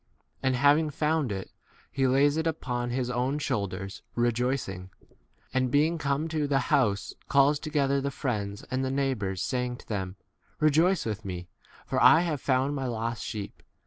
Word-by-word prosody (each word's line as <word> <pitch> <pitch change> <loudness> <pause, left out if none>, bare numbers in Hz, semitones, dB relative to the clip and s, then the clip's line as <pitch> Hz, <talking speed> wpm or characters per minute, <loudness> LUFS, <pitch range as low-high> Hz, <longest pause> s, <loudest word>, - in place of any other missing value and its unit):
and 130 -1 +1
having 145 +4 +4
found 150 -3 0
it, 95 -1 -5 0.4
he 135 -1 +1
lays 140 +3 +4
it 160 +1 0
upon 125 -6 -2
his 125 0 -1
own 125 +3 0
6 150 - -3
shoulders, 100 -7 -3
rejoicing; 120 -6 -1 0.6
and 130 0 +1
being 155 +5 +2
come 145 +1 0
to 155 -2 -1
the 140 -1 +2 0.2
house, 105 -6 +2 0.2
calls 140 +1 +4
together 140 -3 0
the 140 - -1
friends 105 -7 -3
and 130 +1 0
the 130 - -1
neighbours, 130 -9 -1
saying 125 -1 -2
to - - -16
them, 95 -3 -3 0.4
Rejoice 160 +5 +3
with 110 -1 -3
me, 90 -2 -6 0.4
for - - -1
I 160 - +8
have 160 -6 -2
found 135 +1 +1
my 135 -2 -2
lost 115 -1 -3
sheep. 105 -2 -6
130 Hz, 170 wpm, -28 LUFS, 110-145 Hz, 0.6 s, I